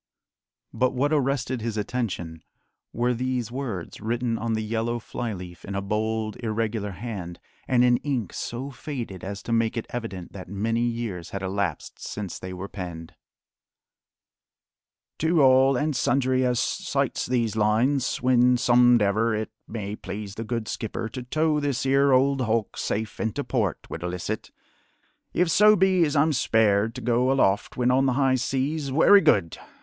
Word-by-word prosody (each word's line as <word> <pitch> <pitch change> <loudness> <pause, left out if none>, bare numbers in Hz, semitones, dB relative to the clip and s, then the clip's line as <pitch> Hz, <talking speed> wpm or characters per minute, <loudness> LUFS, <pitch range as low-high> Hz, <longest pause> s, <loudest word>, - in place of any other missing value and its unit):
But 130 0 +1
what 145 +4 +1
arrested 135 -3 0
his 110 -1 -3
attention 100 -8 -3 0.5
were 120 +1 0
these 125 -1 -2
words 120 -11 -5
written 115 +2 -1
on 115 0 -2
the 110 0 -1
yellow 115 +2 -1
fly 120 0 -5
leaf 90 -3 -8
in 100 - -6
a 100 - -1
bold, 110 +1 -2
irregular 110 -2 -2
hand, 95 -4 -6 0.3
and 125 -1 +4
in 120 -1 +5
ink 125 - -3
so 130 +4 -5
faded 120 - -6
as 100 +1 -6
to - - -5
make 115 0 +1
it 115 - -2
evident 105 -7 -6
that 95 -2 -9
many 110 +4 -1
years 115 -7 -3
had 100 -1 -5
elapsed 95 -4 -3
since 100 -4 -6
they 95 - -7
were 90 +2 -6
penned: 85 -5 -7 2.1
"To 160 -1 +3
all 130 0 +5
and 150 +2 0
sundry 130 0 +2
as 125 -1 +1
sights - - -1
these 120 -4 0
lines, 120 +7 +1
when 125 0 +4
somedever 120 -3 +4
it 110 - -5 0.2
may 105 -2 -5
please 100 -1 -7
the 115 - -5
Good 115 -1 -3
Skipper 110 0 -4
to 130 - -6
tow 155 +4 +1
this 140 -3 -1
'ere 135 +1 +4
old 135 +1 +3
hulk 115 -3 0
safe 110 +1 -3
into 115 +6 -2
port, 110 - -1
widelicit. 90 +1 -4 0.8
If 175 -1 +1
so 210 +4 +6
be 190 -2 +3
as 150 0 -2
I'm 155 +2 +3
spared 110 -3 +2
to 125 - -6
go 125 +2 +2
aloft 105 -7 +1
when 125 0 +2
on 135 +1 +3
the 130 - +2
high 135 0 +2
seas, 135 +3 -1
wery 195 +8 +6
good! 85 - +2
115 Hz, 160 wpm, -25 LUFS, 105-130 Hz, 2.1 s, so